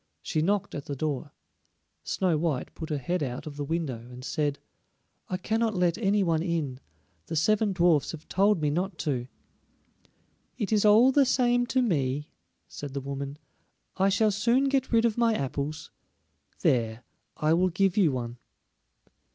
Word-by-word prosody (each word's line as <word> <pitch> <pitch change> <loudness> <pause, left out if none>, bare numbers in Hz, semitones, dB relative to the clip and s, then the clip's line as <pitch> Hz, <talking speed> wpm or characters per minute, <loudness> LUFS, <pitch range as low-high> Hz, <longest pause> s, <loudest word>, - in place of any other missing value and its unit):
She 155 - -1
knocked 200 +4 0
at 145 - -5
the 140 - -4
door. 145 0 -3 0.7
Snow 185 -4 0
white 150 -4 -1
put 160 -1 -7
her 150 - -1
head 175 +6 -2
out 130 -1 -4
of 150 -2 -7
the 145 - -3
window 150 -5 -2
and 125 +1 -10
said: 145 -3 -1 0.7
"I 185 - -1
cannot 220 +3 0
let 175 -2 +2
any 205 -2 +2
one 165 -3 +1
in; 160 -7 -2 0.5
the - - -4
seven 210 +6 +2
dwarfs 175 -5 +3
have 160 -1 -10
told 200 0 +3
me 145 - +2
not 180 +3 -2
to." 125 -5 -1 1.3
"It 220 -2 -1
is 210 0 +3
all 220 +5 +7
the 275 -1 +4
same 245 -1 +2
to 260 0 +2
me," 145 - -1 0.4
said 145 -2 -8
the - - 0
woman. 140 +1 -5 0.6
"I 195 +1 +3
shall 210 +2 +3
soon 235 +7 +2
get 270 -1 0
rid 230 0 +4
of 230 0 0
my 230 -2 +3
apples. 140 +1 -4 0.7
There, 115 -1 +1 0.3
I 155 +1 +2
will 185 +2 +3
give 195 +1 +1
you 185 -8 +4
one." 120 -2 -4
170 Hz, 165 wpm, -27 LUFS, 145-210 Hz, 1.3 s, all